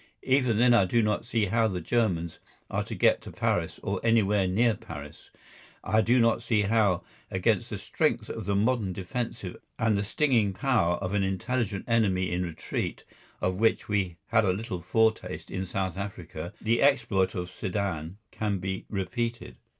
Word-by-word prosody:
Even 130 -4 +2
then 120 +1 +5
I 100 -5 +5
do 115 +5 +2
not 105 +1 0
see 115 -3 +1
how 115 +3 +2
the 95 -4 -2
Germans 90 -8 0 0.3
are - - 0
to - - -5
get - - +3
to - - -9
Paris - - -1
or - - -2
anywhere 105 -4 +3
near 115 +5 +3
Paris. 75 -7 -10 0.5
I 110 0 +3
do 120 +3 +3
not 115 -1 +3
see 115 -3 +1
how 100 -3 +2 0.3
against - - +1
the - - -4
strength - - 0
of - - -5
the 100 - +1
modern 105 -2 +1
defensive 115 +6 -4 0.2
and 110 -1 +2
the 100 - +1
stinging 110 -2 +2
power 100 -7 +2
of 95 0 -4
an 105 - +2
intelligent 100 +2 -1
enemy 100 -6 +2
in 90 +1 0
retreat, 85 -3 -4 0.4
of 95 +1 0
which 115 0 +2
we 95 -5 -1
had - - +4
a 95 -3 +2
little 95 -3 -4
foretaste 110 -1 0
in 95 0 -3
South 95 0 -2
Africa, 90 -4 -6
the 115 +1 +1
exploit 110 -9 +3
of 90 0 -4
Sedan 95 -4 -3
can 105 -2 -1
be 95 +1 -4
repeated. 115 +4 -3
100 Hz, 175 wpm, -28 LUFS, 95-115 Hz, 0.5 s, then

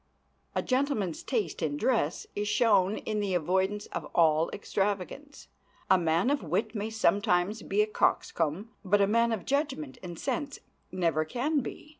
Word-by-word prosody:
A - - 0
gentleman's 255 - 0
taste 215 - -2
in 150 -3 -1
dress 175 - 0
is 205 0 -2
shown 210 -2 +3
in 215 -1 -3
the 200 -3 0
avoidance 190 +5 0
of - - -4
all 160 -1 +4
extravagance. 205 +9 -3 0.4
A 190 - +7
man 170 +8 +2
of 290 - 0
wit 195 +6 -1
may 210 0 -3
sometimes 205 -1 +1
be 205 +2 +1
a - - +1
coxcomb, 190 -1 0
but 205 +1 +3
a 200 - +5
man 230 +3 +2
of 215 -6 -3
judgment 280 -1 -2
and 175 -2 -7
sense 285 - -3 0.3
never 165 -4 +1
can 270 - 0
be. 280 +3 -7
205 Hz, 160 wpm, -29 LUFS, 180-235 Hz, 0.4 s, A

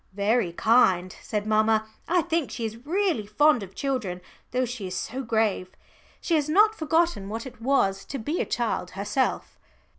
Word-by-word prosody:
"Very 205 -1 +1
kind," 185 -3 +3
said 210 -1 -3
mamma. 215 0 +2 0.2
"I 350 -1 +2
think 330 -3 -1
she 235 - -4
is 225 +5 -7
really 350 - 0
fond 290 +4 +3
of 195 -1 -9
children 250 -11 -2 0.3
though 255 +1 0
she 235 -5 -5
is 185 0 -4
so 255 +7 -4
grave. 220 -6 0 0.4
She 340 - -2
has 305 -2 +2
not 420 +7 +5
forgotten 320 - 0
what 225 +3 -5
it 250 -4 -11
was 200 -7 +1
to 280 - -5
be 295 +9 -2
a - - -1
child 230 -6 -1
herself." 205 +7 -1
230 Hz, 175 wpm, -26 LUFS, 205-295 Hz, 0.4 s, not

